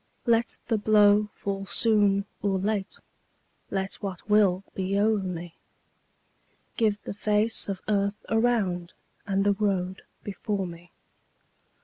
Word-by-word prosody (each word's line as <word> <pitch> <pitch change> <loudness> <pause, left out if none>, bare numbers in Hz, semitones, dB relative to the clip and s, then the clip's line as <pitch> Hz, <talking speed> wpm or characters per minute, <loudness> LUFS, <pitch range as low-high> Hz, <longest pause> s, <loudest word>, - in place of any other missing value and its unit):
Let 230 -1 +2
the 225 -2 +1
blow 210 0 +4
fall 195 -1 -4
soon 205 -3 +3 0.2
or 195 -2 0
late, 200 0 -2 0.7
Let 195 0 -2
what 195 -3 -6
will 200 -3 +3
be 190 +1 -1
o'er 215 +1 +3
me; 175 -3 -5 1.2
Give 210 -2 +1
the - - -5
face 210 +1 +3
of 195 -2 -4
earth 200 -1 0
around, 220 -7 0 0.3
And 195 0 +1
the 205 0 +3
road 190 -2 -1 0.2
before 205 0 -3
me. 175 0 -11
200 Hz, 120 wpm, -26 LUFS, 190-210 Hz, 1.2 s, blow